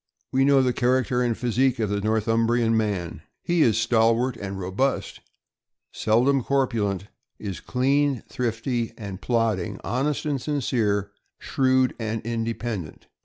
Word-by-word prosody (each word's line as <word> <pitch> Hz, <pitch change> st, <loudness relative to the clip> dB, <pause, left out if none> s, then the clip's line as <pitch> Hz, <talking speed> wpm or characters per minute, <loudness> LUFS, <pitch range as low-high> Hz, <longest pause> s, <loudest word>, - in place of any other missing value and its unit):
We 135 Hz, +1 st, +3 dB
know 140 Hz, -1 st, +5 dB
the 125 Hz, -1 st, +1 dB
char 130 Hz, +2 st, +2 dB
acter 125 Hz, 0 st, 0 dB
and 120 Hz, -2 st, 0 dB
physique 125 Hz, +2 st, +1 dB
of 110 Hz, -3 st, -1 dB
the 100 Hz, 0 st, -1 dB
Northumbrian 115 Hz, +2 st, +1 dB
man. 100 Hz, -6 st, -2 dB, 0.2 s
He 175 Hz, -1 st, +1 dB
is 115 Hz, -8 st, +4 dB
stal 115 Hz, 0 st, +3 dB
wart 125 Hz, +1 st, -1 dB
and 100 Hz, -3 st, -6 dB
robust, 95 Hz, +9 st, -1 dB, 0.7 s
seldom 125 Hz, +5 st, +2 dB
corpulent; 110 Hz, -9 st, 0 dB, 0.3 s
is 95 Hz, -7 st, -5 dB
clean, 135 Hz, -, +1 dB
thrifty 120 Hz, 0 st, -2 dB
and 100 Hz, -4 st, -7 dB
plodding, 115 Hz, -6 st, 0 dB
honest 140 Hz, +5 st, -1 dB
and 145 Hz, -4 st, -1 dB
sincere, 110 Hz, -9 st, 0 dB, 0.3 s
shrewd 130 Hz, -1 st, +1 dB
and 110 Hz, 0 st, -2 dB
independent. 115 Hz, -6 st, -4 dB
115 Hz, 135 wpm, -24 LUFS, 110-130 Hz, 0.7 s, know